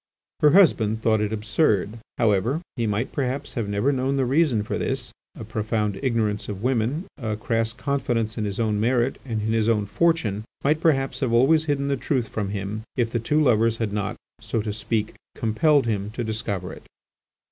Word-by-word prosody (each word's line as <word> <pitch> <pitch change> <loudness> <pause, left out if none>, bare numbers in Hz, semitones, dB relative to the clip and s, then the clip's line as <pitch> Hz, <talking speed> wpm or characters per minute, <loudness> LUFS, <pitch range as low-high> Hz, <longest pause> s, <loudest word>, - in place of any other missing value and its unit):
Her 150 -1 +5
husband 110 - +4
thought 110 -2 +3
it 105 0 -1
absurd; 105 - 0 0.2
however, 115 +5 +2 0.2
he 115 -4 -1
might 105 +4 -1
perhaps 135 +1 -2
have 115 -5 -2
never 105 +7 +1
known 135 0 0
the 135 - +2
reason 130 -5 +2
for 110 - -3
this; 130 -2 -2 0.3
a - - -6
profound 105 -2 -2
ignorance 110 -5 0
of 100 0 -5
women, 130 - 0
a 110 -4 -2
crass 115 +1 0
confidence 120 -5 -1
in 110 - -2
his 100 +1 -4
own 110 -2 +1
merit, 120 +3 +1
and 110 -5 -3
in 110 +1 0
his 115 0 +2
own 105 -3 +2
fortune, 110 -5 +1 0.2
might 150 +3 +2
perhaps 135 -5 +1
have 130 -4 0
always 140 +7 +4
hidden 140 -2 0
the 140 -1 0
truth 125 -7 -1
from 105 -3 -3
him, 100 +1 -4
if 115 -2 0
the 120 - 0
two 150 +7 +1
lovers 115 -3 +3
had 110 -3 -2
not, 105 -1 -2 0.2
so 115 - -2
to 105 -1 -3
speak, 110 0 -2 0.2
compelled 140 +6 +2
him 105 -3 -1
to 120 - -3
discover 110 -4 -3
it. - - -11
115 Hz, 190 wpm, -24 LUFS, 105-135 Hz, 0.3 s, Her